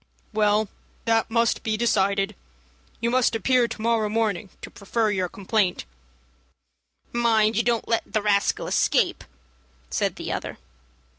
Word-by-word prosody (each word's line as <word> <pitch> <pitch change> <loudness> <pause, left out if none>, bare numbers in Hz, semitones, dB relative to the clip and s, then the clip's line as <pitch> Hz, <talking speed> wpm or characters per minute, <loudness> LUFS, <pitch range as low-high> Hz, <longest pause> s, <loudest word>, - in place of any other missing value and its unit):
"Well, 210 0 +2 0.4
that 225 -1 +2
must 230 0 +1
be 220 -1 -1
decided. 200 -3 +1 0.7
You 235 0 +1
must 255 -2 +2
appear 245 +2 +3
to 225 - -7
morrow 225 -2 +1
morning 210 -3 -1
to - - -8
prefer 215 +2 -1
your 185 -3 -1
complaint." 195 -1 -1 1.3
"Mind 225 -2 +3
you 225 - +3
don't 235 -1 0
let 230 0 -1
the 215 -2 0
rascal 200 -1 +1
escape," - - +1 0.7
said - - 0
the - - -5
other. - - -4
220 Hz, 135 wpm, -24 LUFS, 205-230 Hz, 1.3 s, appear